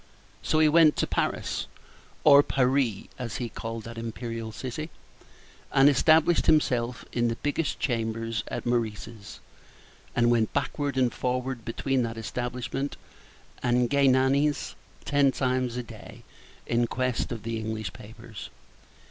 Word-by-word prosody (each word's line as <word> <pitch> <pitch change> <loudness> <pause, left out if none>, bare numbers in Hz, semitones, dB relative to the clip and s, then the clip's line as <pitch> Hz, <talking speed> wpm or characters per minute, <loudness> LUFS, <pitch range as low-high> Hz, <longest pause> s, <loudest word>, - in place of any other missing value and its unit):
So - - +1
he 155 0 +5
went 155 0 +6
to - - +1
Paris, - - -2 0.6
or 140 -1 +8
Parry, 130 -6 +1
as 115 -3 -4
he 120 -2 -3
called 115 0 -6
that 115 +1 -8
imperial 115 -1 -5
city, 130 +8 -5 0.8
and 135 +1 +6
established 160 +3 +4
himself 125 -6 +2
in 120 -1 +1
the 115 - -1
biggest 145 +1 -1
chambers 115 -2 -1
at - - -5
Meurice's, 115 -2 -3 0.8
and 120 0 +4
went 115 -3 +2
backward 140 -1 -1
and 125 -2 +2
forward 125 -1 -2
between 130 +3 -1
that 115 -1 -3
establishment 125 +4 -4 0.6
and 125 -1 +2
Galignani's 140 +1 +3 0.3
ten 140 -1 +3
times 130 -2 -1
a 125 - -2
day - - -12 0.4
in 120 0 +1
quest 125 0 -1
of 115 -3 -5
the 115 0 -3
English 110 -1 -4
papers. 110 -2 -10
125 Hz, 130 wpm, -27 LUFS, 115-135 Hz, 0.8 s, or